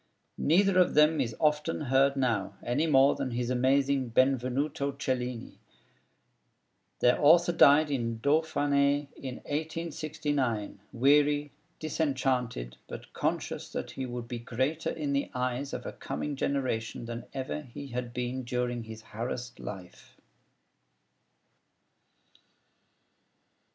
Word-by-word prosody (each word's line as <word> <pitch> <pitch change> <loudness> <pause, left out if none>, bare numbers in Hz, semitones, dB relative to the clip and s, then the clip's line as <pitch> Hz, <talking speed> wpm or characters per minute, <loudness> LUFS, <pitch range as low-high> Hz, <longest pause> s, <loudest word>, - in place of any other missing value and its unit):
Neither 185 +4 +4
of 180 - +3
them 150 0 +5
is 115 -4 -2
often 150 -1 +1
heard 135 0 +3
now, 110 -7 0
any 135 +7 0
more 135 -2 +5
than - - -3
his 120 0 -2
amazing 135 +1 +2
'Benvenuto 135 +3 +1
Cellini.' 125 -3 -3 1.4
Their 125 +4 +3
author 170 +4 +6
died 150 -2 +6
in 115 -4 -1
Dauphiné 145 0 +2
in 130 -2 -6
1869, 150 - -2
weary, 145 +3 +3 0.3
disenchanted, 130 - -1
but - - -9
conscious - - -2
that - - -4
he 130 -1 -4
would 120 -1 -6
be 120 0 -5
greater 130 +7 -1
in 145 -3 -2
the 140 - 0
eyes 125 +2 -2
of - - -5
a - - -5
coming 150 -1 -4
generation 130 -5 -2
than 115 0 -6
ever 135 +3 -3
he 140 +1 -9
had 120 -1 -4
been 125 +1 -3
during 120 -1 -2
his 110 0 -9
harassed 120 +2 -5
life. 95 -3 -10
135 Hz, 115 wpm, -29 LUFS, 120-145 Hz, 1.4 s, author